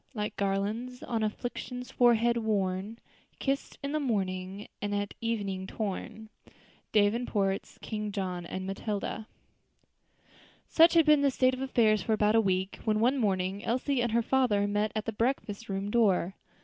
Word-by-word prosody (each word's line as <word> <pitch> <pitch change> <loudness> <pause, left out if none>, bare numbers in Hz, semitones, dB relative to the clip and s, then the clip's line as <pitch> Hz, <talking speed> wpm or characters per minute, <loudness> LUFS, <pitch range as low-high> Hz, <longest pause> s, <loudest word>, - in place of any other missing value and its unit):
Like 210 -1 -3
garlands, 210 +6 -2
on 230 -2 -2
afflictions's 245 +3 -4
forehead 235 -1 +4
worn, 205 -1 -1 0.4
Kissed 275 0 -2
in 280 - -2
the 305 - 0
morning, 195 -6 -2
and 205 0 -1
at 205 0 -2
evening 200 -5 -2
torn." 215 +1 -5 0.6
DAVENPORT'S 205 -2 +1
King 210 -1 -3
John 185 -3 -3
and 185 +2 -5
Matilda. 205 +2 -4 1.4
Such 335 +1 +6
had 330 -2 +6
been 300 -2 +6
the 280 - +4
state 255 0 +2
of 255 - -4
affairs 225 -6 +3
for 220 - 0
about 210 0 +3
a 225 - +5
week, 190 -1 -1
when 215 -1 +1
one 255 +5 +3
morning 195 -2 0
Elsie 255 +2 0
and 240 -1 0
her 235 +1 +2
father 230 -6 +2
met 205 +1 0
at 215 - -2
the 225 - -3
breakfast 225 -2 -2
room 195 +1 -2
door. 195 -6 +3
215 Hz, 155 wpm, -29 LUFS, 200-240 Hz, 1.4 s, Such